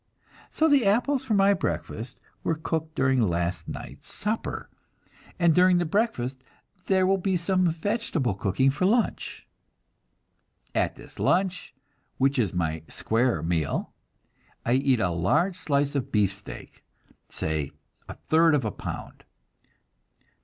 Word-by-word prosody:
So 320 - +2
the 285 -4 +4
apples 250 +6 +2
for 225 -5 +1
my 200 0 +5
breakfast 120 - -4 0.2
were 165 - +1
cooked 160 0 -3
during 130 -1 +2
last 85 -3 -1
night's - - -8
supper; 215 +2 -3 0.7
and 170 -2 +4
during 180 +1 +5
the 175 - +1
breakfast 135 - -1 0.4
there 190 -1 +3
will 195 +1 +2
be 190 0 +1
some 185 +1 +2
vegetable 165 - -1
cooking 100 +8 +1
for 165 +7 +1
lunch. 230 +3 0 1.3
At - - 0
this - - -14
lunch, 185 -6 0 0.4
which 135 0 +2
is 105 -7 +1
my 80 -3 -1
"square 120 +2 0
meal," 80 -2 -1 0.7
I 120 - +2
eat 130 -1 +3
a 95 -4 +1
large 95 - +1
slice 145 -5 0
of 140 -3 -2
beefsteak, 100 -2 -2 0.5
say 80 -3 -2 0.4
a - - -6
third 160 0 +3
of 135 -5 0
a 110 - -1
pound. - - -7
145 Hz, 130 wpm, -26 LUFS, -, 1.3 s, my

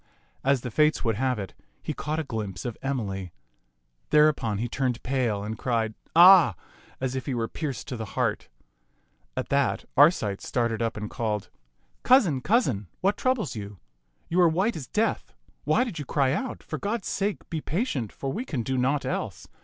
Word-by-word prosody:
As 135 -2 +2
the 125 - -5
Fates 150 +5 +3
would 115 -2 +2
have 130 0 +1
it, 95 -3 -6 0.3
he - - -3
caught 155 +1 -3
a 160 - -1
glimpse 110 -8 -5
of 120 -3 -3
Emily. 100 -9 -3 0.8
Thereupon 150 -8 +3
he 115 +4 -1
turned 125 -1 -2
pale 120 -6 0
and 110 +1 -5
cried 115 -3 0 0.2
" - - -47
Ah! 175 - +8 0.2
" - - -26
as 130 0 -2
if 130 -2 -4
he 135 - -1
were 115 -1 -1
pierced 140 -6 -5
to 125 - -3
the 110 -3 -7
heart. - - 0 0.9
At - - -2
that 140 -1 +1
Arcite 135 - +4
started 115 -2 -1
up 115 -1 -1
and 105 0 -4
called, 105 -3 -3 0.3
" - - -42
Cou 260 +1 +7
sin, 155 - -1
cousin, 130 - +1
what 195 +2 +2
troubles 255 - 0
you? 100 -2 -7 0.5
You 180 +2 +2
are 175 - +6
white 190 +8 +1
as 145 -6 -6
death. 220 0 -1 0.3
Why 155 - +3
did 225 -11 -5
you 145 - -5
cry 135 -1 +1
out? 250 - -3
For - - -5
God's 205 0 -2
sake, 200 +1 -2
be 160 -2 -2
patient, 150 - -2
for 135 -1 -4
we 230 - -3
can 140 - -3
do 130 +2 -1
naught 135 +3 +1
else. - - -4
130 Hz, 195 wpm, -26 LUFS, 115-160 Hz, 0.9 s, Ah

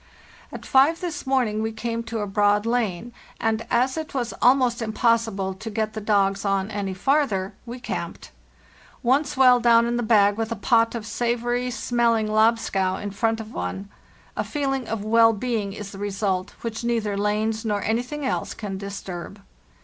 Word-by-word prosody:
" - - -24
At - - -8
five 285 +5 +4
this 330 -6 -5
morning 245 -5 +1
we 220 0 -1
came 230 +1 -3
to 230 -2 -3
a - - -1
broad 205 +1 +2
lane, 230 -2 -1 0.3
and 225 +1 -1
as 255 +2 +2
it 315 -3 -5
was 240 -5 -2
almost 250 -1 +4
impossible 225 -3 +1
to 215 +4 -7
get 215 0 -2
the 215 - -5
dogs 200 -2 +1
on 195 0 0
any 195 -2 -3
farther, 210 -4 +1
we 240 +2 -6
camped. - - -6 0.7
Once 265 +4 +1
well 250 -2 +6
down 235 -1 +5
in 240 0 -1
the - - 0
bag 205 -3 +4
with 225 0 -2
a - - 0
pot 230 -1 +2
of 225 -2 -5
savory 240 +2 -1
smelling 235 -2 +1
lobscouse 215 -4 +1
in 205 - -4
front 225 +3 0
of 220 0 -8
one, 195 +1 -4 0.5
a - - -1
feeling 270 -4 -2
of 220 -2 -3
well 225 +1 +5
being 215 -2 -2
is 200 0 -7
the 195 - -10
result, 195 -1 -2
which 230 0 -4
neither 225 -4 0
lanes 215 +2 0
nor 210 -3 -1
anything 250 +6 -2
else - - -2
can 195 -3 -5
disturb. 195 -1 -7
225 Hz, 180 wpm, -24 LUFS, 205-240 Hz, 0.7 s, well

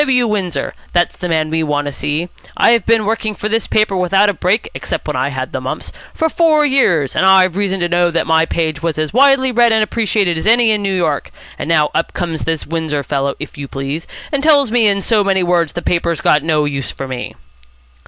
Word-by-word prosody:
W. 255 -4 +2
Windsor. 185 -10 -2 0.2
That's 175 0 +1
the 180 - -5
man 155 -1 0
we 160 0 0
want 145 -2 -1
to 145 - -3
see. 150 +5 -3 0.3
I've 235 0 +3
been 225 -2 +3
working 220 0 -2
for 210 - -4
this 225 +1 -1
paper 215 -2 +1
without 195 +3 +2
a - - 0
break, 190 +4 0
except - - -4
when - - -2
I - - 0
had - - -5
the - - -4
mumps, - - -5 0.2
for 320 - 0
four 315 -2 +2
years, 180 - +2
and - - +1
I've 190 -2 +4
reason 195 -1 -1
to 175 - +1
know 175 0 +2
that 170 -1 -1
my 160 0 +2
page 160 -3 -2
was 165 -2 -2
as 155 +2 -2
widely 265 0 +4
read 240 -1 +3
and 220 -1 +3
appreciated 205 -6 0
as 180 - -4
any 230 0 +4
in 210 -1 0
New 195 -1 -1
York. 160 -6 -1 0.3
And - - -4
now 155 -3 +2
up 165 - -2
comes 165 -3 -3
this 160 -1 -2
Windsor 160 -3 -3
fellow, 140 -1 -2
if 150 0 -8
you 140 - -5
please, 135 +4 -5 0.2
and 285 -2 -1
tells 285 -5 +4
me 235 -2 +4
in 200 -1 +1
so 215 0 +2
many 190 -2 +1
words 175 -3 +1
the 175 - -5
paper's 170 -2 -1
got 150 - +3
no 155 -1 +1
use 140 -2 -3
for 135 - -7
me." 130 -1 -6
180 Hz, 230 wpm, -16 LUFS, 160-220 Hz, 0.3 s, I've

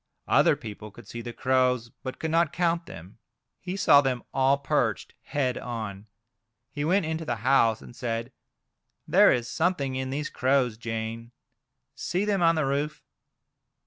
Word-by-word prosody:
Other - - +4
people 105 0 -9
could 105 +1 -15
see 120 - -7
the 120 0 -6
crows, 125 -1 +1
but 130 -1 -6
could 160 - -3
not 165 -2 +3
count 170 -1 0
them. 80 +1 -9
3O - - -18
Crows. - - -57 0.3
He 185 +1 -5
saw 145 -7 +6
them 130 -3 -1
all 135 +1 +3
perched 140 - -1
head 130 -4 -1
on. 110 -4 -6 0.6
He 145 - -3
went 180 +3 +2
into 160 +1 -3
the 120 -6 -2
house, 115 -5 +3
and 120 - -13
said: 120 -2 -3 0.8
"There - - +6
is 120 -2 0
something 140 -2 0
in 130 0 -3
these 150 +3 -3
crows, 130 -1 +1
Jane; 115 0 -5 0.6
see 185 +3 -2
them 200 -3 +1
on 165 -1 +4
the 155 -3 +1
roof." 145 +3 -2
130 Hz, 170 wpm, -27 LUFS, 115-155 Hz, 0.8 s, saw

